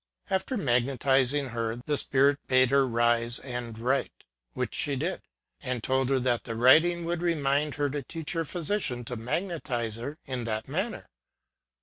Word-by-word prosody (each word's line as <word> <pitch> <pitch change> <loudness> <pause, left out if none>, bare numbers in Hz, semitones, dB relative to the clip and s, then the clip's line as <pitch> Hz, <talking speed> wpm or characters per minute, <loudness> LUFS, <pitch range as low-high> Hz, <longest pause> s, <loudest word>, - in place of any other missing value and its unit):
After 190 +7 0
magnetizing 135 - +2
her, 115 -1 -2
the 150 - +1
spirit 140 +1 +3
bade 130 -1 +4
her 140 0 +5
THE 135 - +1
PROPHETIC 120 0 +2
SPIRIT. 130 - -5
81 125 0 -1
rise 120 - -7
and 110 - -10
write 130 +4 0
ŌĆö - - -32
which - - -2
she 145 -2 0
did 165 +8 -2
ŌĆö - - -32 0.4
and 125 -4 -3
told 130 0 +1
her 135 -1 +3
that 120 -2 +1
the 115 - -4
writing 165 +9 +5
would 170 0 -2
remind 150 -3 +1
her 145 0 +1
to 145 0 -3
teach 160 +4 -5
her 165 -1 0
physician 160 - -2
to 125 - -5
magnetize 120 - -3
her 140 +6 -6
in 130 -4 -4
that 110 0 -3
manner. 190 - -3
135 Hz, 195 wpm, -28 LUFS, 120-150 Hz, 0.4 s, her